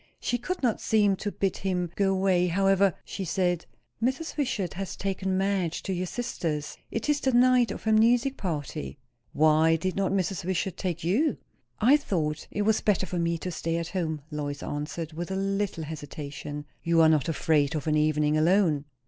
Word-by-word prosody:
She 245 - -1
could 365 +6 -4
not 235 -4 +1
seem 205 -3 +3
to 205 - -3
bid 195 -2 -1
him 180 -3 -2
go 195 -1 +2
away. 185 -2 +2
However, 195 +1 +3
she 195 - -5
said 175 -1 0 0.3
"Mrs. 265 +7 -1
Wishart 245 - -1
has 195 0 -5
taken 190 -1 -2
Madge 190 -4 0
to 190 - -2
your 180 0 -2
sister's. 165 -11 -3
It 225 - -3
is 295 -1 +2
the 265 - +1
night 250 0 +5
of - - -6
her 220 - +1
music 240 +5 +4
party." 145 - -4 0.4
"Why 155 +2 +4
did 180 +3 -2
not 195 -1 0
Mrs. 190 -2 -1
Wishart 185 +1 -1
take 175 -4 -3
you?" 230 - +2 0.4
"I 255 +7 +6
thought 160 - -2
it 205 - -1
was 220 +1 +2
better 200 -2 +2
for 180 -1 -3
me 170 0 0
to 180 +2 -5
stay 165 0 -2
at 170 0 -3
home," 165 -5 -2
Lois 145 -1 -4
answered, 155 +2 -4
with 175 +3 -5
a 190 - -2
little 195 -3 -1
hesitation. 145 -1 -7 0.2
"You 165 0 +2
are 160 - +7
not 155 0 +2
afraid 155 -2 +1
of 150 - -3
an 155 -1 +1
evening 150 0 +2
alone!" 160 -2 +3
180 Hz, 190 wpm, -27 LUFS, 160-200 Hz, 0.4 s, are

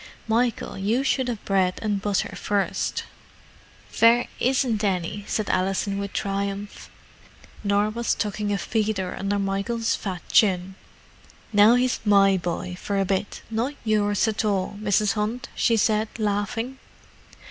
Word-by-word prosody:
Michael, 230 -2 0
you 220 +7 +1
should 265 -1 +1
have 235 -4 -4
bread 190 -2 +1
and 205 -2 0
butter 205 -1 -1
first." 205 -1 -1 0.9
"Vere 235 +1 +5
isn't 245 -4 +1
any," 195 +1 -1
said 215 -2 -1
Alison 195 +2 0
with 200 -1 -4
triumph. 200 0 -3 0.7
Norah 205 +1 +2
was 235 +1 -1
tucking 210 -1 -2
a 200 - +1
feeder 210 -3 -1
under 200 +1 -1
Michael's 200 +4 -1
fat 185 -4 -5
chin. 190 -3 +3 0.8
"Now 210 +3 +7
he's 250 0 +1
my 200 -2 +5
boy 180 0 -3
for 200 -1 -1
a 195 - +2
bit—not 220 +7 -2
yours 210 -1 +2
at 220 0 -1
all, 200 -2 0
Mrs. 210 0 +2
Hunt," 225 +4 -3
she 230 -2 +2
said, 215 0 +2
laughing. 220 +4 -2
205 Hz, 135 wpm, -24 LUFS, 195-225 Hz, 0.9 s, Now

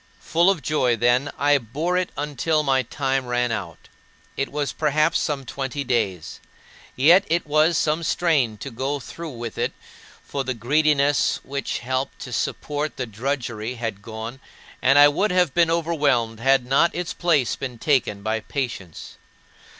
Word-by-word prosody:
Full 170 +3 +2
of 185 -6 0
joy, 130 -6 +2
then, 120 +4 +2
I 145 0 +3
bore 150 +10 -2
it 180 -1 0
until 150 +2 0
my 135 -2 +2
time 135 +1 -2
ran 120 -1 0
out 95 -8 -6 0.5
it 135 - -2
was 145 -1 -2
perhaps 155 0 +2
some 140 -3 -2
twenty 135 +2 -4
days 100 - -2 0.6
yet 170 +9 +6
it 170 -1 0
was 155 +2 +3
some 155 0 +1
strain 155 -9 +1
to 135 +7 -7
go 135 +5 -2
through 165 +5 -8
with 120 -4 -7
it, - - -1 0.5
for 140 - -3
the 130 -1 -3
greediness 145 +3 +2
which 140 0 -3
helped 130 +1 -2
to - - -7
support 150 +1 -2
the 125 - -2
drudgery 120 0 -3
had 115 -4 -4
gone, 115 +4 -7 0.4
and 135 +2 +4
I 145 0 +9
would 175 +9 +1
have 180 -6 +2
been 170 -1 +3
overwhelmed 145 -9 +1
had 135 +1 +3
not 135 +7 +2
its 175 -1 -3
place 155 -9 +1
been 125 -3 -6
taken 115 -7 0
by 110 +1 0
patience. 110 - -6
135 Hz, 160 wpm, -23 LUFS, 120-155 Hz, 0.6 s, I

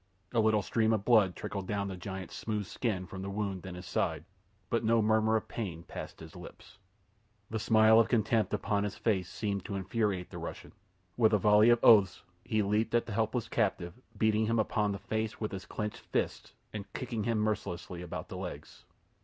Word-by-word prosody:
A 120 - +2
little 110 -1 +3
stream 110 -1 +2
of 105 -2 -1
blood 105 -7 +4
trickled 100 -2 -5
down 100 -1 -1
the 95 - -5
giant's 95 0 -7
smooth 105 -2 -3
skin 95 -3 -2
from 95 +1 -8
the 100 - -4
wound 100 -2 -3
in 90 - -6
his 90 +1 -9
side; - - -1 0.5
but - - +1
no 115 +1 +3
murmur 110 0 +3
of 110 - -1
pain 90 -8 -5
passed - - -8
his - - -11
lips. 100 - -12 0.7
The 110 - -1
smile 110 0 +6
of 115 - +3
contempt 110 -1 +2
upon 100 -1 0
his 105 -1 -3
face 95 -6 0
seemed 105 -2 -3
to 100 - -4
infuriate 100 -1 -1
the - - -7
Russian. - - -7 0.5
With 110 -2 +4
a - - +6
volley 105 +3 +5
of 120 0 +4
oaths 105 -5 +6 0.2
he 110 -1 0
leaped 105 +4 +1
at 120 - +2
the 115 - -6
helpless 115 +2 0
captive, 95 -7 -1 0.2
beating 110 0 +2
him 115 +1 +1
upon 105 -1 +1
the 100 - -3
face 110 +3 -3
with 110 - -3
his 95 -1 -7
clenched 105 -1 -4
fists - - -2 0.2
and 105 -2 -7
kicking 115 -5 -3
him 115 -1 +1
mercilessly 90 -5 -2
about 90 - -6
the - - -7
legs. - - -8
105 Hz, 200 wpm, -31 LUFS, 100-110 Hz, 0.7 s, smile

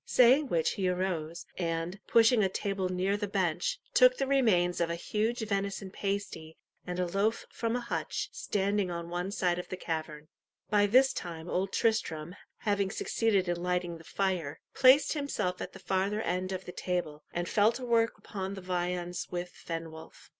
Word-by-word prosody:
Saying 260 +4 +5
which 165 -8 +1
he 190 -2 0
arose, 175 -3 -2
and, 165 +2 -2
pushing 230 -1 +5
a 190 - +2
table 195 -1 -2
near 185 +2 0
the 205 0 -2
bench, 195 - 0
took - - +6
the - - 0
remains 210 -11 +3
of 170 - +1
a 170 - -1
huge 220 +7 -1
venison 200 -1 -2
pasty 195 -6 -4 0.3
and 180 0 -3
a 180 - +2
loaf 200 +5 0
from 230 0 -1
a 245 - -1
hutch 235 - -3
standing 200 -1 0
on 170 -1 -5
one 175 +2 -2
side 180 -3 0
of 180 - -7
the 185 - -4
cavern. 155 -3 -4 0.4
By 205 -1 +4
this 260 +5 +5
time 165 -1 -6
Old 190 +2 -1
Tristram, 175 -7 0 0.3
having 200 -2 +1
succeeded 205 -2 +1
in 175 0 -1
lighting 180 -1 -1
the - - -13
fire, 180 -6 -2
placed 265 +2 +6
himself 215 - -2
at - - -5
the - - -9
farther 200 +3 0
end 185 +2 -1
of 185 0 -4
the - - -6
table, 175 -5 -3
and 175 0 -2
fell 210 +4 +4
to 255 +1 -5
work 230 -1 +2
upon 195 -1 -5
the 190 - -7
viands 180 0 -2
with 175 0 -4
Fenwolf. 165 -1 -8
185 Hz, 180 wpm, -30 LUFS, 175-210 Hz, 0.4 s, took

